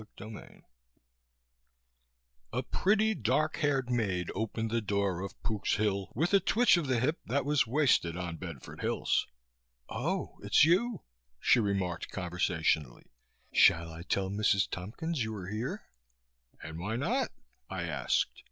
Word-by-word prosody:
CHAPTER 110 +2 -8
2 - - -20 1.9
A - - 0
pretty, 215 +3 +2
dark 150 - +1
haired 135 -4 +1
maid 95 -7 0
opened 110 +2 -2
the 115 0 +1
door 100 -3 0
of 100 0 -7
"Pook's 105 -3 0
Hill" 100 -2 -1
with 160 - +1
a 200 - +7
twitch 235 +5 +4
of 170 -5 -1
the 130 -2 +2
hip 150 +8 0
that 135 +2 0
was 145 -4 +2
wasted 120 - +2
on 85 -2 -4
Bedford 85 -8 -8
Hills. - - +1 0.6
"Oh, - - -3
it's - - +5
you!" 195 +5 +2 0.4
She - - +4
remarked 95 -5 -1
conversationally. 85 -7 -1 0.4
"Shall 85 0 +5
I 80 - -8
tell 95 +2 -1
Mrs. 100 -1 +2
Tompkins 125 - -3
you 110 0 -4
are 95 -2 -6
here?" 110 +4 -3 0.8
"And 80 +1 -7
why 105 +6 -2
not?" 130 +4 0 0.4
I - - -3
asked. - - 0
110 Hz, 145 wpm, -31 LUFS, 90-140 Hz, 1.9 s, a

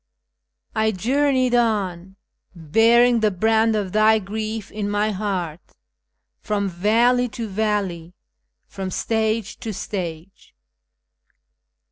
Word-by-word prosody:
" - - -58 0.3
I 220 0 +2
journeyed 255 +4 +1
on, 195 -6 0 0.4
bearing 230 +9 +4
the 215 -1 +3
brand 220 +3 +2
of 200 -3 -2
Thy 215 +2 +4
grief 215 +1 -5
in 205 -1 -3
my 205 +1 0
heart, 185 -5 -3 0.8
From 205 -1 -2
valley 230 +7 +2
to 230 0 -5
valley, 195 -5 -2 0.5
from 190 -1 -6
stage 220 +2 -1
to 225 - -5
stage." 180 - -7
215 Hz, 105 wpm, -22 LUFS, 190-225 Hz, 0.8 s, bearing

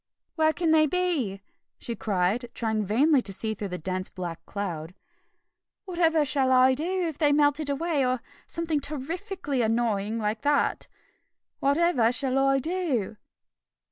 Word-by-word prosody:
"Where 315 -1 +3
can 330 0 0
they 310 -1 +5
be?" 290 - -1 0.3
she 235 - -4
cried, 205 +4 -1
trying 220 -2 -1
vainly 265 +8 +3
to 200 - 0
see 220 +3 -1
through 205 -1 -5
the 180 -1 -4
dense 185 +2 -3
black 175 -3 -6
cloud. 180 -4 -5 0.9
"Whatever 330 -4 +2
shall 270 -2 +2
I 255 0 +5
do 350 +6 -1
if 315 -3 -6
they 305 - +4
have 290 - +3
melted 290 0 +2
away, 295 0 0
or 255 0 0 0.3
something 330 -3 -1
terrifikly 300 - -3
annoying 225 -2 0
like 215 0 -2
that? 290 0 +1 0.7
Whatever 280 -5 +2
shall 265 +1 +1
I 270 0 +3
do?" 270 - -1
270 Hz, 145 wpm, -26 LUFS, 220-315 Hz, 0.9 s, they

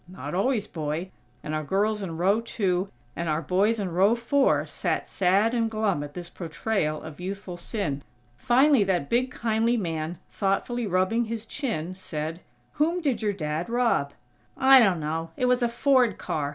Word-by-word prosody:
"Not 175 -5 -7
always, 210 +3 +1
boy," 160 +2 -4 0.3
and 150 - -4
our 155 0 -1
girls 210 +6 0
in 170 -4 -5
row 195 +6 +2
two 195 -5 -1 0.3
and 170 -1 -2
our 155 +2 0
boys 200 +7 +2
in 190 -3 -2
row 195 +6 +4
four 265 +4 +2
sat - - -2
sad 195 +5 +2
and 230 -2 +1
glum 215 -8 0
at 145 0 -9
this 175 -1 -6
portrayal 165 -1 -2
of 155 -1 -9
youthful 190 0 -5
sin. 170 -6 -3 0.3
Finally 255 - +4
that 180 -7 -1
big 250 +2 +2
kindly 230 0 +1
man, 165 -3 -3
thoughtfully 215 +4 -1
rubbing 190 +6 +1
his 225 0 -5
chin, 220 - -3
said: 160 -3 -5 0.4
"Whom 335 +4 +2
did 280 -9 -1
your 210 -2 0
Dad 155 0 -3
rob?" 230 -13 +1 0.4
"I 265 0 +8
dunno. 165 -6 +1
It 250 - +1
was 250 0 +3
a 240 - +2
Ford 245 -2 +3
car. 145 -2 -2
195 Hz, 170 wpm, -26 LUFS, 165-230 Hz, 0.4 s, I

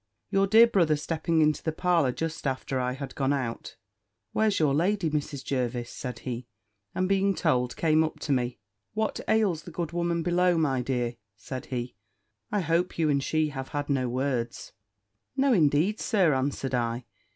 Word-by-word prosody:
Your 195 0 +3
dear 220 +4 +8
brother 175 -9 +3
stepping 160 +2 0
into 155 0 +2
the 160 - -1
parlour 165 -4 +2
just 160 +2 -3
after 130 0 -2
I 125 0 -1
had 135 0 -6
gone 135 -1 0
out, 125 -5 -4 0.6
"Where's 215 -2 +2
your 150 -3 +3
lady, 175 +2 +1
Mrs. 145 -2 -3
Jervis?" 120 -2 -2
said 125 -2 -6
he. 125 -1 -4 0.5
And 185 0 +1
being 195 0 +2
told, 125 -6 +1
came 160 -1 +3
up 155 - -4
to 145 - -2
me: 125 -2 0 0.4
"What 220 0 -1
ails 210 -7 +2
the 165 - -10
good 170 -1 -4
woman 170 -1 0
below, 180 0 +3
my 135 -5 +1
dear?" 120 -2 -2 0.2
said 130 +3 -7
he: 125 -1 -4 0.6
"I 205 - +1
hope 170 +1 0
you 160 -3 +2
and 140 -1 +1
she 155 +1 +1
have 135 -2 -5
had 145 0 -3
no 130 -3 +1
words?" 125 -2 -2 0.7
"No, 270 -1 +4
indeed, 165 +4 +3
Sir," 190 -9 +3
answered 135 0 -1
I. 120 0 -1
150 Hz, 175 wpm, -27 LUFS, 130-175 Hz, 0.7 s, dear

